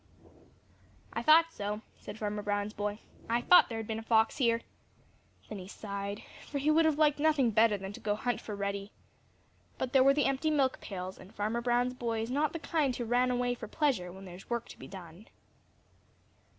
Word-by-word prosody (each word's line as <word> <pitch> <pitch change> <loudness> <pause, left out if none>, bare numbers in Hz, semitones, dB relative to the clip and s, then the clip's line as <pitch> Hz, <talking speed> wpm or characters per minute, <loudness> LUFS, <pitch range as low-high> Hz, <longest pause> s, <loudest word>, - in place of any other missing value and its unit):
"I - - -2
thought 330 +1 +6
so," 205 +1 -4 0.2
said 210 - -9
Farmer 210 -1 -3
Brown's 205 0 -2
boy. 205 +1 -3 0.3
"I 235 +1 +2
thought 360 +8 +6
there 225 - -4
had 225 - -4
been 220 +1 -3
a - - -6
fox 225 0 +2
here." 230 -3 +2 0.9
Then 210 - -6
he 185 - -9
sighed, 200 0 -5 0.2
for 290 - -4
he 285 +2 +2
would 320 +1 +4
have 310 -2 +2
liked 300 -2 +3
nothing 290 -6 +3
better 220 0 +4
than 195 +1 -7
to - - -9
go 205 -1 -1
hunt 245 +3 -2
for 210 - -6
Reddy. 200 0 -3 0.9
But 260 -1 -3
there 265 -1 +6
were 275 +1 +5
the 295 - +2
empty 275 +3 +1
milk 275 -4 +1
pails, 185 -1 -6
and 185 +2 -13
Farmer 215 +3 -1
Brown's 245 +1 +1
boy 230 -3 -2
is 230 - -5
not 290 +3 +1
the - - -4
kind 295 -4 0
who 240 - -3
run 245 +2 +2
away 245 0 +1
for 240 - -7
pleasure 230 - 0
when 190 +2 -11
there 180 - -9
is 180 - -13
work 235 -1 -2
to - - -12
be - - -9
done. 185 +1 -11
230 Hz, 210 wpm, -31 LUFS, 205-270 Hz, 0.9 s, thought